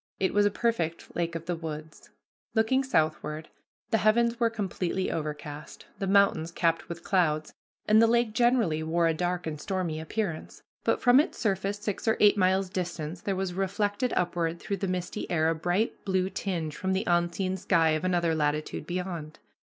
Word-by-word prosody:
It 190 - +1
was 205 0 +4
a - - +3
perfect 200 -7 -2
lake 170 -1 -1
of 165 0 -5
the 175 0 -1
woods. 155 -1 -8 0.5
Looking 225 +5 +3
southward, 155 - -1 0.4
the 225 - +3
heavens 230 +3 +3
were 230 -1 +3
completely 190 -4 -2
overcast, 150 -1 -6
the 195 - -2
mountains 195 -5 +3
capped 165 0 0
with 170 0 -7
clouds, 155 -5 +1 0.3
and 215 +1 +6
the 230 - +6
lake 235 -1 +2
generally 230 -9 +2
wore 165 +2 +1
a 165 - +3
dark 175 +2 -2
and 150 -2 -4
stormy 180 -4 -2
appearance, 170 +1 -4 0.2
but - - +1
from 245 +1 +6
its 310 - 0
surface 200 -2 -1
six 205 +1 -4
or 220 - +3
eight 210 0 +6
miles 190 0 +2
distant 175 -2 -4
there 195 - 0
was 190 -1 -2
reflected 205 +5 -1
upward 170 -1 0
through 200 - -3
the 195 - -2
misty 180 +2 -3
air 160 -2 +2
a - - +2
bright 175 +7 -1
blue 190 -1 0
tinge 165 -6 -3
from 190 0 -1
the 190 +2 0
unseen 175 +2 +1
sky 175 -4 +2
of 155 +1 0
another 175 -2 +1
latitude 150 0 -1
beyond. 175 -4 -4
180 Hz, 180 wpm, -28 LUFS, 165-205 Hz, 0.5 s, and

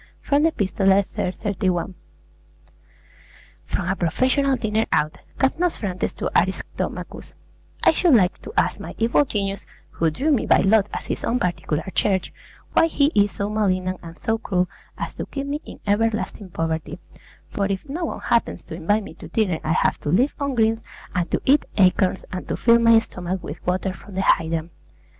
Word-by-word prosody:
From 285 0 +2
the 325 +1 +4
'Epistolae' 195 -3 +2
iii. 180 - 0
31. 190 -2 -1 1.7
FROM 175 - -2
A 190 - +1
PROFESSIONAL 260 - +2
DINER 220 -2 0
OUT 150 +1 +1 0.2
CAPNOSPHRANTES 265 - +1
TO - - -3
ARISTOMACHUS 190 +2 -3 0.5
I - - +7
should 325 -2 +4
like 185 -5 +2
to - - -8
ask - - +2
my - - -8
evil 235 +5 +3
genius, 200 -5 -2 0.3
who 165 - +1
drew 275 - 0
me 270 - +2
by - - +6
lot 205 0 +4
as - - -5
his - - -3
own 245 - +1
particular 175 -6 -1
charge, 190 -3 +1 0.4
why 330 - +5
he 290 -2 +2
is 205 0 +4
so 200 0 -3
malignant 185 -3 0
and 165 +1 -10
so 225 -1 -1
cruel 185 -4 0 0.3
as - - -4
to - - -6
keep 275 -1 -4
me 290 +2 -3
in - - -10
everlasting 210 -1 0
poverty; 165 -1 -3 0.5
for 200 -1 -1
if 195 +7 -3
no 330 +5 -3
one - - -5
happens 230 -6 0
to - - -9
invite 205 +6 +1
me - - -9
to - - -11
dinner 195 -8 0
I 160 - +1
have - - +1
to - - -4
live 240 - +3
on 280 -2 -1
greens, 225 0 +2 0.3
and 175 -1 -1
to - - 0
eat 280 +2 +4
acorns 185 -1 +3
and 185 - -5
to - - -2
fill 235 0 +5
my 230 -1 +6
stomach 185 -4 -3
with 150 - -7
water 185 +1 0
from 200 0 -13
the 190 - 0
hydrant. 165 -1 +1
200 Hz, 180 wpm, -23 LUFS, 180-235 Hz, 1.7 s, I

